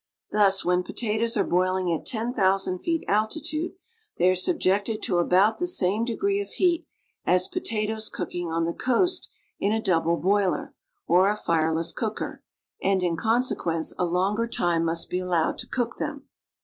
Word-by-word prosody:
Thus, 200 Hz, -2 st, +4 dB
when 180 Hz, 0 st, +3 dB
potatoes 225 Hz, +4 st, -1 dB
are 200 Hz, -, +3 dB
boiling 185 Hz, 0 st, +1 dB
at 160 Hz, -, -4 dB
ten 230 Hz, +1 st, -2 dB
thousand 190 Hz, -3 st, +1 dB
feet 330 Hz, -, -1 dB
altitude, 305 Hz, -, -1 dB, 0.4 s
they 180 Hz, +2 st, +4 dB
are -, -, +1 dB
subjected 205 Hz, -, 0 dB
to 180 Hz, -3 st, +1 dB
about 190 Hz, -, +3 dB
the 355 Hz, -, 0 dB
same 210 Hz, -, +1 dB
de 235 Hz, -1 st, -2 dB
gree 400 Hz, 0 st, +1 dB
of 405 Hz, -, -7 dB
heat 350 Hz, -3 st, +1 dB, 0.4 s
as 180 Hz, +1 st, +3 dB
potatoes 215 Hz, 0 st, -2 dB
cooking 175 Hz, -1 st, -4 dB
on 165 Hz, 0 st, 0 dB
the 170 Hz, -, -2 dB
coast 305 Hz, +9 st, +1 dB, 0.3 s
in 200 Hz, -, +1 dB
a 220 Hz, -, +1 dB
double 170 Hz, -5 st, +1 dB
boiler, 195 Hz, +1 st, +1 dB, 0.3 s
or 185 Hz, +3 st, +4 dB
a 210 Hz, -, +1 dB
fireless 165 Hz, -3 st, 0 dB
cooker, 220 Hz, -2 st, -4 dB, 0.4 s
and, 190 Hz, -1 st, +1 dB
in 175 Hz, -2 st, +1 dB
consecjuence, 175 Hz, -5 st, 0 dB
a 180 Hz, -, +2 dB
longer 195 Hz, +6 st, 0 dB
time 175 Hz, -7 st, 0 dB
must 165 Hz, 0 st, -1 dB
be 180 Hz, -, -2 dB
allowed 175 Hz, -3 st, 0 dB
to -, -, -7 dB
cook 240 Hz, -2 st, -2 dB
them. -, -, -5 dB
195 Hz, 170 wpm, -25 LUFS, 175-225 Hz, 0.4 s, Thus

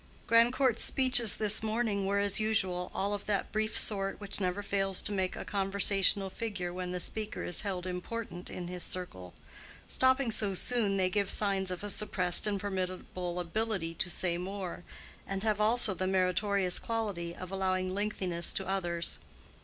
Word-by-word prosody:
Grandcourt's 240 Hz, +1 st, +3 dB
speeches 245 Hz, -5 st, +4 dB
this 215 Hz, -1 st, +2 dB
morning 215 Hz, -3 st, -2 dB
were, 200 Hz, +1 st, 0 dB
as 200 Hz, 0 st, +2 dB
usual, 190 Hz, -5 st, 0 dB
all 200 Hz, +1 st, -2 dB
of 205 Hz, 0 st, -6 dB
that 205 Hz, -2 st, -2 dB
brief 215 Hz, 0 st, -2 dB
sort 195 Hz, -2 st, +2 dB
which 200 Hz, -1 st, -7 dB
never 185 Hz, +1 st, -2 dB
fails 195 Hz, -2 st, -1 dB
to -, -, -2 dB
make 190 Hz, -2 st, -2 dB
a -, -, -7 dB
conversational 195 Hz, 0 st, +2 dB
figure 200 Hz, -6 st, -5 dB
when 180 Hz, 0 st, -5 dB
the 180 Hz, -, -4 dB
speaker 215 Hz, +4 st, -2 dB
is 175 Hz, -, +3 dB
held 185 Hz, -3 st, -4 dB
important 180 Hz, 0 st, -6 dB
in 175 Hz, -1 st, -7 dB
his 180 Hz, 0 st, -4 dB
circle. 95 Hz, -, -4 dB, 0.5 s
Stopping 260 Hz, -1 st, +3 dB
so 205 Hz, -3 st, +3 dB
soon, 210 Hz, -2 st, +4 dB
they 185 Hz, -1 st, +1 dB
give 200 Hz, -1 st, -1 dB
signs 195 Hz, -2 st, +1 dB
of 180 Hz, +1 st, -5 dB
a 205 Hz, -, -4 dB
suppressed 185 Hz, -2 st, +4 dB
and 200 Hz, -1 st, -1 dB
formidable 185 Hz, -2 st, -4 dB
ability 180 Hz, -1 st, -3 dB
so 185 Hz, -, -1 dB
say 175 Hz, -1 st, +1 dB
more, 185 Hz, -1 st, -6 dB, 0.4 s
and 195 Hz, 0 st, -4 dB
have 215 Hz, -1 st, 0 dB
also 225 Hz, -1 st, +4 dB
the 185 Hz, 0 st, -3 dB
meritorious 190 Hz, 0 st, +2 dB
quality 200 Hz, -7 st, -4 dB
of 185 Hz, 0 st, -9 dB
allowing 185 Hz, -1 st, -2 dB
lengthiness 190 Hz, -4 st, -2 dB
to 190 Hz, -, -3 dB
others. 175 Hz, -3 st, -1 dB
195 Hz, 170 wpm, -30 LUFS, 180-210 Hz, 0.5 s, speeches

